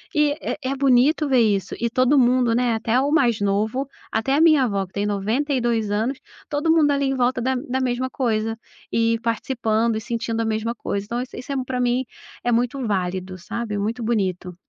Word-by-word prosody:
eh, 300 0 +1
é 260 - -1
é - - -1
bonito 275 +3 +3
ver 265 -2 +3
isso. 205 -4 +1
E 235 - 0
todo 255 +4 +3
mundo, 250 -1 +3
né, 240 -1 +1
até 225 +2 +1
o 280 +2 0
mais 245 -9 +2
novo, 215 +7 0 0.2
até 245 +5 +1
a 300 - +3
minha 310 -4 +6
avó 200 -4 -1
que 185 - -23
tem 205 0 -1
92 230 +1 0
anos, 225 +6 -1 0.3
todo 300 +2 +1
mundo 320 -3 +4
ali 280 0 +1
em 270 0 0
volta 250 0 +1
da 260 +2 0
da 260 0 -2
mesma 255 0 -1
coisa, 225 -4 -1 0.3
e 230 0 +2
participando 230 -1 0
e - - -4
sentindo 230 -1 -2
a - - -1
mesma 220 +1 -1
coisa. 200 -3 -3
Então 235 +3 -3
isso 255 - -8
isso 255 - -7
é - - -1
pra 255 0 -3
mim 245 +1 +1 0.4
é 240 - +1
muito 245 +3 +1
válido, 185 -2 -2
sabe. 220 +3 -5
É - - -1
muito 220 +4 -2
bonito. 190 -5 -1
235 Hz, 210 wpm, -22 LUFS, 220-260 Hz, 0.4 s, minha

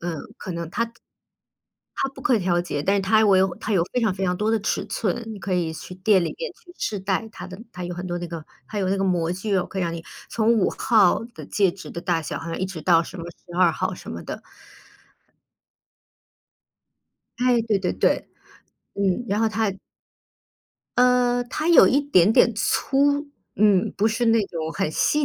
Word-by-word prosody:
嗯， 170 -1 -3 0.2
可 - - -7
能 - - -2 0.2
它 230 +1 -1 1.0
它 270 - 0
不 270 - -13
可 255 - +3
以 - - +3
调 175 -2 +1
节， 145 -5 -3
但 195 +5 +2
是 195 - 0
它 220 +3 +4
围 190 -2 +5 0.2
它 220 - -2
有 175 -4 +3
非 250 - +1
常 215 -5 +1
非 195 - -2
常 180 0 0
多 210 +3 0
的 225 - +2
尺 215 - -1
寸， 230 +2 -2
你 210 - -8
可 195 -1 -4
以 170 -3 0
去 180 - -9
店 190 -1 +3
里 - - -4
面 - - -3
去 350 - -18
试 205 - -2
戴 195 +3 -1
它 180 -4 -9
的 185 0 -10
它 180 0 -6
有 175 - -4
很 180 +1 -6
多 175 0 -3
那 175 - -5
个 165 -2 -7 0.2
它 210 - -5
有 190 - 0
那 195 - +1
个 195 - 0
模 175 -3 +1
具， 195 +2 -1
可 190 - -7
以 - - 0
让 170 -1 -1
你 165 0 -7 0.2
从 225 0 +2
5 195 - +2
号 215 -5 +4
的 - - -9
戒 195 -3 +2
指 185 +2 -10
的 170 - -6
大 170 -3 0
小， - - -4
好 160 - -8
像 165 - -4
一 185 - -1
直 185 -4 -6
到 165 -1 +4
什 170 - -9
么 165 - -6
12 175 +1 +1
号 185 +2 -2
什 - - -10
么 - - -6
的。 - - -7 3.0
哎， 245 -1 +3
对 215 -3 +1
对 185 - -1
对。 - - +1 0.7
嗯， 200 +4 0
然 205 +1 0
后 225 - +3
它 215 -1 0 1.3
呃， 250 -1 +4
它 305 +7 -3
有 340 - +8
一 280 - +3
点 215 -9 +4
点 235 - +5
粗， 285 +6 +1 0.3
嗯， 200 -3 +3
不 215 +2 +3
是 230 +2 0
那 225 0 +4
种 160 -1 -4
很 190 -6 -1
细 295 - +2
195 Hz, 220 characters per minute, -23 LUFS, 180-225 Hz, 3.0 s, 有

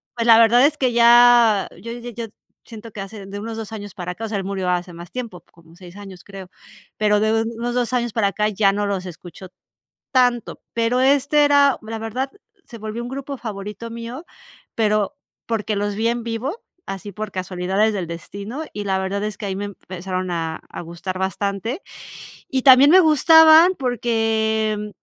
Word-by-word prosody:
pues 235 -1 -2
la 225 -1 +8
verdad 235 +3 +6
es 300 +1 +1
que 255 -4 0
ya 235 -3 +6
yo 230 - -7
yo 240 0 -8
yo 230 0 -6 0.4
siento 225 0 -11
que 205 - -7
hace 195 0 -9
de 200 +1 -7
unos 225 +2 -6
2 225 -1 -7
años 205 -3 -8
para 180 -1 -5
acá, 225 +5 -6
o - - -4
sea, 215 -1 -3
él 195 - -3
murió 190 -1 -3
hace 180 0 -1
más 170 +1 -11
tiempo, 235 -8 -6
como 165 -1 -20
6 180 0 -14
años, 195 -2 -11
creo, 195 -2 -11 0.5
pero 210 -1 +2
de 215 +1 +1
de 225 0 +2
unos 240 +1 -3
2 250 0 -1
años 240 -3 -1
para 220 -3 +1
acá 210 +2 0
ya 200 -1 +2
no 205 +1 -1
los 195 -2 -3
escuchó 180 +1 -10 0.6
tanto, 245 -3 +1
pero 230 +2 +1
este 285 +2 +3
era, 285 -1 +4
la 220 +1 -6
verdad, 250 +5 -4 0.3
se 235 - -11
volvió 220 +1 -6
un 240 - -6
grupo 275 +1 -6
favorito 210 0 -7
mío, 235 +7 -8 0.5
pero 215 +3 0 0.3
porque 220 -2 -2
los 205 0 -2
vi 220 +2 0
en 235 0 -2
vivo, 235 - -4 0.2
así 195 +1 -7
por 210 +2 -6
casualidades 185 +3 -1
del 190 -4 -3
destino, 200 - -7
y 205 - -4
la 190 -1 0
verdad, 195 +2 -3
es 210 -1 -4
que 205 - -4
ahí 190 - -3
me 200 +1 -4
empezaron 185 -2 -6
a 165 -2 -3
a - - -7
gustar 170 +2 -6
bastante, 200 - -3 0.7
y 265 -1 0
también 270 +2 +8
me 370 - +8
gustaban 320 +2 +7
porque, 225 -3 0
mm, 210 0 -6
220 Hz, 195 wpm, -21 LUFS, 195-240 Hz, 0.7 s, la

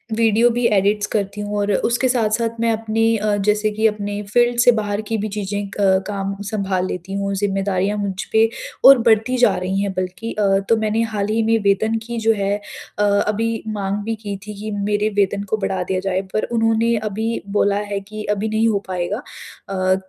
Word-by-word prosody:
Video 225 +1 +4
भी 240 +1 -1
edits 205 +1 +2
करती 205 -1 -2
हूँ 205 0 -3
और 205 0 0
उसके 240 +5 +1
साथ-साथ 230 -1 0
मैं 230 0 +2
अपनी 225 0 +1
अ, 210 0 0
जैसे 210 +1 +1
कि 220 +1 +2
अपने 205 -1 -3
फ़ील्ड 240 +4 +2
से 245 0 +7
बाहर 205 0 -2
की 225 - 0
भी 215 +1 -2
चीज़ें 205 0 -2
अ, 195 -1 +2
काम 195 -1 -3
संभाल 195 -4 -1
लेती 185 +1 -5
हूँ। 200 0 -2
ज़िम्मेदारियाँ 195 0 0
मुझ 200 -2 -3
पे 220 0 +4 0.4
और 270 0 +10
बढ़ती 225 +3 +2
जा 245 - +4
रही 185 +2 -2
हैं 200 -1 -1
बल्कि 185 +5 -4
अ, 195 -2 +2
तो 230 - +4
मैंने 220 +1 0
हाल 200 -1 -1
ही 220 +1 +1
में 225 +1 +3
वेतन 205 +3 +2
की 235 0 -4
जो 225 0 +3
है 200 0 0 0.4
अ, - - +3
अभी 210 +2 +1
माँग 205 -1 -2
भी 225 0 -1
की 210 -2 -6
थी 210 -1 -7
कि 215 +1 -5 0.2
मेरे 210 +1 +1
वेतन 200 0 0
को - - +3
बढ़ा 190 -3 -2
दिया 185 +1 -1
जाए 190 0 -1
पर 215 - 0
उन्होंने 225 0 +2 0.2
अभी 220 +3 -2 0.2
बोला 200 0 +2
है 200 - -1
कि 210 +2 -8
अभी 210 +1 -1
नहीं 220 +1 +2
हो 210 -3 +1
पाएगा। 185 +4 -2 0.5
अ, 185 -1 +1
210 Hz, 205 wpm, -20 LUFS, 200-225 Hz, 0.5 s, और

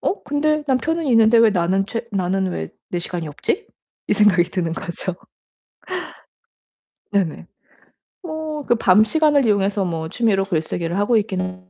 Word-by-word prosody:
'어 400 - -2
근데 300 +1 0
남편은 295 +5 0
있는데 230 -2 +5
왜 225 -1 +6
나는 190 +1 +1
최 230 +1 -5
나는 190 0 0
왜 80 - -4 0.2
내 175 - -1
시간이 170 -2 -4
없지?' 370 - -3 0.4
이 - - +3
생각이 195 -5 +4
드는 175 -2 -3
거죠. 175 0 -5 2.0
네네. 190 -6 -1 0.8
뭐 315 -3 -5
그 240 - +3
밤 210 -1 +5
시간을 295 0 +3
이용해서 200 -1 +1
뭐 160 -2 -3
취미로 210 -4 +1
글쓰기를 170 0 -2
하고 205 +4 +2
있기는 185 -3 -2
200 Hz, 280 characters per minute, -21 LUFS, 180-255 Hz, 2.0 s, 왜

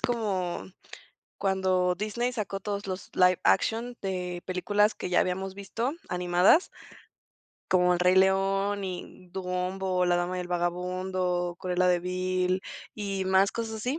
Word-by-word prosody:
como 200 -7 -1 0.7
cuando 185 -2 +1
Disney 215 +5 -2
sacó 205 -4 -3
todos 200 0 -4
los 185 0 -5
live 180 -1 +4
action 230 - +1
de 180 -2 -3
películas 205 +4 +1
que - - -5
ya 180 - +3
habíamos 190 +1 -1
visto, 225 +7 -3 0.2
animadas 180 - +4 1.0
como 180 -1 +4
El 175 - -2
Rey 180 +1 +4
León 195 +1 +2
y 180 0 -7
Dumbo, 180 0 -1
la 175 0 +3
Dama 175 +1 -1
y - - -2
el 180 - -6
Vagabundo, 180 0 -1
Cruela 180 0 +1
de 180 -1 +3
Vill 185 +1 -1 0.3
y 195 -2 -3
más 190 +1 +3
cosas 225 -1 -4
así 250 +8 -2
185 Hz, 140 wpm, -28 LUFS, 180-200 Hz, 1.0 s, live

